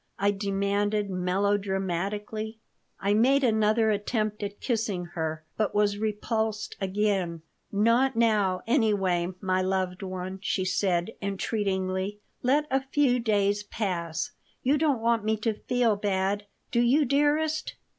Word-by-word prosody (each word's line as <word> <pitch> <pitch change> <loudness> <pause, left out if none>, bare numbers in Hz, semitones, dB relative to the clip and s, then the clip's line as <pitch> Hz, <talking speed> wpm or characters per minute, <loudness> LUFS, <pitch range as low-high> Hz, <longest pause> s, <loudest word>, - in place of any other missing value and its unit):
I 200 0 +2
demanded, 200 +1 0
melodramatically 195 +3 -1 0.4
I 200 +1 +1
made 265 +6 +4
another 220 -1 +3
attempt 210 0 -1
at 205 0 -5
kissing 215 -7 -1
her, 160 -1 -3
but 215 -1 0
was 205 -1 +2
repulsed 215 0 -2
again 190 -4 0 0.3
"Not 230 +6 +3
now, 210 -5 +2
anyway, 205 -8 +2
my 185 -1 +1
loved 185 -1 -1
one," 185 0 -5
she 190 -1 -1
said, 185 0 +1
entreatingly. 195 -1 -1 0.2
"Let 285 +4 +2
a 270 0 +2
few 270 -2 +2
days 205 -3 +1
pass. 180 -6 -3 0.3
You 280 +3 +3
don't 290 -7 +2
want 230 -1 +2
me 220 0 +1
to 220 +1 0
feel 235 0 +1
bad, 200 0 -1 0.2
do 235 - +2
you, 270 +5 +4
dearest?" 300 +3 +1
205 Hz, 125 wpm, -27 LUFS, 190-225 Hz, 0.4 s, made